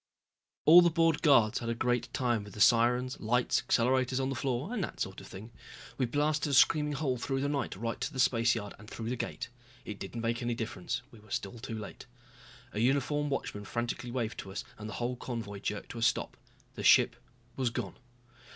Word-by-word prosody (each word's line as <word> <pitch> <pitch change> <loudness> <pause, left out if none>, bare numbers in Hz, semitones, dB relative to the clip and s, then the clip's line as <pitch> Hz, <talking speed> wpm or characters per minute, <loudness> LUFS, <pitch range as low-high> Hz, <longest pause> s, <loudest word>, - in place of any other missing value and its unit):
All 170 +3 +10
the 175 - +5
bored 165 -1 +2
guards 120 -9 +5
had 115 - -4
a 115 - 0
great 120 +1 0
time 120 -4 0
with 105 - -12
the - - -8
sirens, 125 +3 +4
lights, 120 +3 +1
accelerators 130 +2 +2
on 135 0 0
the 135 - -2
floor 135 - -2
and 215 -6 -1
that - - -6
sort - - -3
of - - -12
thing. 105 +5 -10 0.5
We 130 - +2
blasted 150 +3 0
a - - -1
screaming 150 +2 +4
hole 135 -3 -1
through 135 +2 -1
the 140 - 0
night 145 -7 -2
right 115 +4 -4
to - - -2
the 135 - -6
spaceyard 115 -4 +2
and 110 0 -12
through 115 0 -5
the - - 0
gate. 125 - -4 0.4
It 105 - -6
didn't 105 +4 -6
make 115 +2 -1
any 120 -1 -1
difference, 115 +2 -4
we 115 - -14
were 105 0 -19
still 100 +4 -4
too 115 -2 -5
late. 105 +4 -9 0.7
A 105 - -3
uniformed 140 +4 +1
watchman 105 -6 -3
frantically 120 +2 -3
waved 120 -2 -3
to 95 - -7
us 95 - -4 0.2
and 105 0 -6
the - - -6
whole 125 +1 -2
convoy 115 -6 -5
jerked 100 +1 -4
to 120 - -6
a - - -6
stop. 115 0 +1 0.4
The - - -7
ship - - +6 0.4
was 130 -3 0
gone. 115 -5 -4
120 Hz, 215 wpm, -31 LUFS, 115-135 Hz, 0.7 s, All